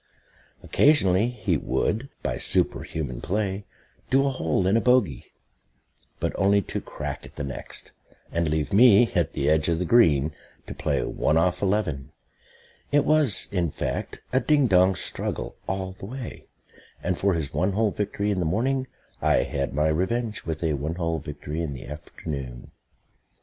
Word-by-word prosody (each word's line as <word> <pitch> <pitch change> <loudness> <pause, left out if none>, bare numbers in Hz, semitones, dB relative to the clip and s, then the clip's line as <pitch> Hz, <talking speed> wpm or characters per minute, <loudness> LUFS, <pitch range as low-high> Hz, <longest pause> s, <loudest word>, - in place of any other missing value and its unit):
Occasionally 110 -9 +4
he 105 -8 -1
would, 115 - -1
by - - -2
superhuman 65 -6 +1
play, 100 +3 -2 0.4
do 135 +1 +4
a 140 - +1
hole 90 - 0
in 100 +5 +4
bogey; 115 - +2 0.9
but - - -1
only 100 +1 +4
to - - -4
crack - - -6
at - - -13
the 75 - -4
next, 70 -2 -6 0.4
and 85 -1 0
leave 80 +4 -1
me, 115 +1 +6
at 85 -3 +1
the 70 -2 -1
edge 80 +1 +3
of 85 - +1
the 90 - -1
green, 80 - +4 0.3
to - - -6
play - - -1
"one 80 - +1
off 90 +2 +1
eleven." 95 - -1 0.8
It 145 0 +3
was, 150 -8 +4
in 90 -4 0
fact, - - -4
a 130 - +4
ding 145 +1 +3
dong 95 -3 +4
struggle - - -4
all 95 -1 -2
the 95 +1 -10
way; 125 +1 -8 0.6
and 90 - 0
for 100 +1 +1
his 75 -4 -3
one 95 +2 +1
hole 110 +1 +2
victory 105 0 -2
in 95 - -1
the - - +1
morning 130 +10 0 0.3
I - - +3
had 70 -1 -2
my 75 +3 +1
revenge 105 +7 -1
with 80 0 -3
a 80 -2 +1
one 75 +4 -3
hole 85 -2 -1
victory 75 +2 -5
in 80 -4 -3
the 65 - -9
afternoon. 70 -4 -7
95 Hz, 165 wpm, -25 LUFS, 80-110 Hz, 0.9 s, me